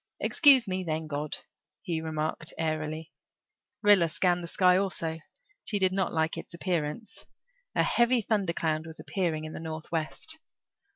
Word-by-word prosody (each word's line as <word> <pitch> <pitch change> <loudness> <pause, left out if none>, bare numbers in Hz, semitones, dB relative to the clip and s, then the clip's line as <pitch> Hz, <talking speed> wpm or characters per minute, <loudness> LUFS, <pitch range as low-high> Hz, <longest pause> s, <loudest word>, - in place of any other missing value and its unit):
"Excuse 270 -6 +6
me, 185 0 -2
then, 160 -2 -2
God," 150 0 -3 0.5
he 165 -2 -2
remarked 155 0 -2
airily. 155 0 -3 0.7
Rilla 200 -5 +6
scanned 180 +1 +1
the 170 - -6
sky 180 +1 +4
also; 170 -4 -1 0.4
she 210 - -1
did 190 -2 +3
not 190 -1 0
like 160 0 0
its - - -9
appearance; 170 +2 -3 0.5
a - - +4
heavy 240 0 +3
thundercloud 170 -7 0
was 160 - -9
appearing 165 -5 -2
in 155 - -7
the - - -5
northwest. 160 - -4
165 Hz, 140 wpm, -29 LUFS, 155-190 Hz, 0.7 s, Excuse